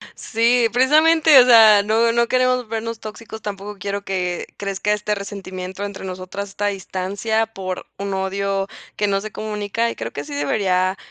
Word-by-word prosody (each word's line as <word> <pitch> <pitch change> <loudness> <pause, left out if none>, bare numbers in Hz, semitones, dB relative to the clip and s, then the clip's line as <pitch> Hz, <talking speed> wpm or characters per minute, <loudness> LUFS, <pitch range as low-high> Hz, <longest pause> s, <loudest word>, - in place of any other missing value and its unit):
Sí, 230 +1 +2
precisamente, 310 +4 +5
o - - +7
sea, 220 -4 +8
no, 225 +3 +2
no 235 0 +2
queremos 255 -1 +1
vernos 225 0 -4
tóxicos, 220 0 -9
tampoco 205 0 -6
quiero 200 +1 -4
que 180 -2 -2
crezca 200 +1 -2
este 210 0 -1
resentimiento 195 -1 -6
entre 200 -1 -7
nosotras, 185 +2 -6
esta 205 +1 -3
distancia 200 +3 -2
por 190 -4 -6
un 200 0 -3
odio 195 0 -1 0.3
que 210 - +1
no 195 -1 0
se 215 +1 -7
comunica, 215 +2 -2
y - - -7
creo 115 0 -5
que 145 - -5
sí 145 - -8
debería 185 +5 0
205 Hz, 170 wpm, -21 LUFS, 190-225 Hz, 0.3 s, sea